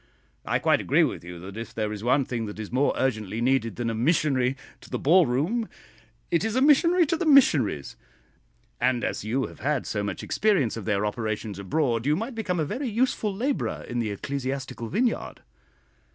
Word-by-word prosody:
I - - +1
quite - - +2
agree - - +3
with - - -2
you 90 0 -8
that 95 +2 -9
if 115 0 -7
there 110 -1 -1
is 105 0 -7
one 130 +3 +3
thing 115 -3 -3
that 105 - -8
is 110 -2 -7
more 130 +3 +2
urgently 110 -5 -1
needed 120 -3 +1
than 120 -1 -3
a 115 - -1
missionary 135 0 +1 0.2
to - - -15
the - - -2
ball 170 +4 +4
room, 170 - 0 0.6
it 170 - +2
is 220 0 -1
a - - +3
missionary 335 +5 +5
to 320 - 0
the 340 - -2
missionaries; 145 - +4 0.8
and 125 -2 +1
as - - -2
you 125 +5 0
have - - -11
had 145 -2 -1
so 105 - -2
much 100 - -4
experience 195 - +1
of 115 -4 -6
their 105 -1 +1
operations 110 -2 -3
abroad, 115 +4 0
you 150 - +3
might 225 +9 -4
become 195 -6 -2
a 155 - +1
very 245 - -3
useful 225 -1 0
labourer 250 +8 -2
in 120 - -3
the 115 -2 -1
ecclesiastical 130 +2 -4
vineyard." 230 - -1
130 Hz, 195 wpm, -26 LUFS, -, 0.8 s, missionary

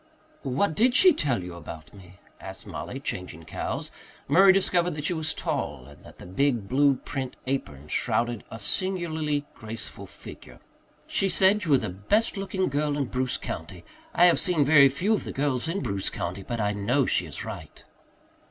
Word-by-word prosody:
"What 140 +8 0
did 245 +9 +3
she 370 -2 +7
tell 130 - -1
you 90 0 -7
about 85 -2 -10
me?" 95 -2 -14 0.2
asked - - -8
Mollie, - - -6
changing 85 -3 -5
cows. - - -4 0.4
Murray 190 +7 +7
discovered 180 -3 +2
that 150 - -5
she 165 - 0
was 160 -1 -2
tall 70 - -3
and 70 +1 -16
that - - -14
the - - -11
big 115 +2 0
blue 140 +3 +4
print 130 0 -5
apron 75 - -3
shrouded 120 +7 0
a - - -7
singularly 155 - -1
graceful 110 -1 -8
figure. - - -12 0.5
"She 195 - 0
said 190 +3 +3
you - - -3
were 140 - +6
the - - -3
best 155 - 0
looking 195 -1 -1
girl 145 +1 0
in 140 - 0
Bruce 130 0 -1
county. - - -7 0.3
I 175 - +5
have 175 - +5
seen 165 -6 +3
very 140 -1 +7
few 185 +11 0
of 215 - 0
the - - -5
girls 135 0 -1
in 190 +5 -2
Bruce 100 0 -2
county, 90 +3 -4
but 120 +4 -4
I 105 -1 +1
know 120 +7 +1
she - - 0
is - - -7
right." - - -9
140 Hz, 185 wpm, -26 LUFS, 105-175 Hz, 0.5 s, she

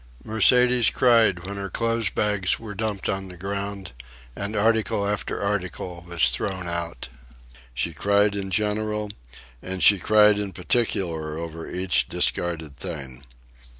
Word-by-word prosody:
Mercedes 125 +2 +4
cried 115 -8 +3
when 100 +1 -6
her 100 0 -4
clothes 115 -1 0
bags 105 -3 0
were 110 -2 -8
dumped 105 -1 -3
on 95 0 -2
the 90 -1 -11
ground 100 0 -4 0.4
and 100 +2 -4
article 105 -1 +1
after 105 0 -2
article 90 -3 -3
was 85 -1 +3
thrown 95 -3 -3
out. 85 -5 -4 0.7
She 85 +6 -1
cried 100 +5 +2
in 100 -1 -3
general, 105 +1 -1 0.5
and 95 0 -4
she 100 -2 +7
cried 105 +1 +5
in 100 -2 -4
particular 85 -7 -1
over 80 0 -7
each 85 -10 +1
discarded 80 -5 -1
thing. 70 -7 -7
100 Hz, 135 wpm, -24 LUFS, 85-105 Hz, 0.7 s, she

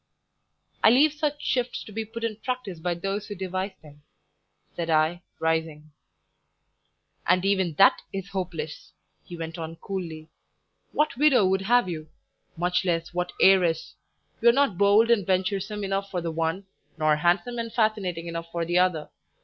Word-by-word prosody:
"I - - +8
leave 280 +6 +5
such 300 -1 -2
shifts 250 -1 -1
to - - -12
be 220 +1 -4
put 230 +2 -8
in 220 -2 -2
practice 235 -7 -4
by 175 +1 -1
those 195 +4 -3
who 205 - -6
devise 190 +1 -4
them," 145 -1 -16 0.7
said 170 -1 -3
I, 160 +2 +2 0.2
rising. 160 -2 -2 1.4
"And 180 +1 +3
even 190 -4 +1
that 195 - +5
is 195 0 -5
hopeless," 175 -5 -5 0.3
he 175 - -9
went 165 0 -6
on 165 0 -6
coolly. 165 -4 -6 0.6
"What 300 -5 0
widow 270 -7 +5
would 190 +1 +2
have 240 +2 +3
you? 155 -3 -6 0.5
Much 180 +3 +1
less, 170 -2 -1
what 180 0 -2
heiress? 180 -4 +4 0.5
You're 235 +1 +6
not 275 -6 +2
bold 205 +4 +4
and 220 -4 +4
venturesome 195 +3 -1
enough 195 0 -2
for 180 - -2
the 170 -1 -3
one, 165 +4 -2 0.3
nor 155 -1 +3
handsome 180 +9 +1
and 230 0 -4
fascinating 210 -7 0
enough 165 0 -6
for 170 0 -2
the 175 +2 +2
other. 180 -4 +1
185 Hz, 160 wpm, -26 LUFS, 165-215 Hz, 1.4 s, I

